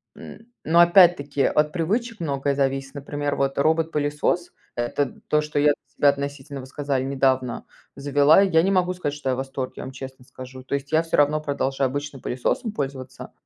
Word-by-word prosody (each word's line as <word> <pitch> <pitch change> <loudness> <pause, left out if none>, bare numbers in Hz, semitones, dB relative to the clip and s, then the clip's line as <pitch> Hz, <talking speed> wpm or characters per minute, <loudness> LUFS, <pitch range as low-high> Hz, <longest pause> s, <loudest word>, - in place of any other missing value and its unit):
м, 225 - -12 0.2
но 165 +2 +3
опять-таки 170 -6 +5
от 150 0 +2
привычек 215 +7 -2
многое 140 -2 -1
зависит, 135 0 -1
например, 145 0 -3
вот, 135 0 -1
робот-пылесос- 155 +2 0 0.2
это 120 +4 -2
то, 150 - +2
что 150 -1 -2
я 145 0 +4 0.3
относительно, 140 0 0
вы 130 - -8
сказали, 140 -1 -2
недавно 130 -2 0 0.3
завела, 145 +4 +4
я 175 -5 +3
не 195 - +1
могу 180 -1 +2
сказать, 175 -5 -3
что 145 -2 -4
я 130 - +1
в - - -8
восторге, 135 -1 -4
я - - -6
вам 130 - -7
честно 130 -1 -10
скажу, 130 0 -11
то 130 - -7
есть 140 0 -5
я 160 +1 +3
всё 165 - -1
равно 145 +1 +3
продолжаю 135 -2 -1
обычным 145 0 -5
пылесосом 165 - -2
пользоваться. 135 -5 -6
145 Hz, 180 wpm, -23 LUFS, 135-155 Hz, 0.3 s, опять-таки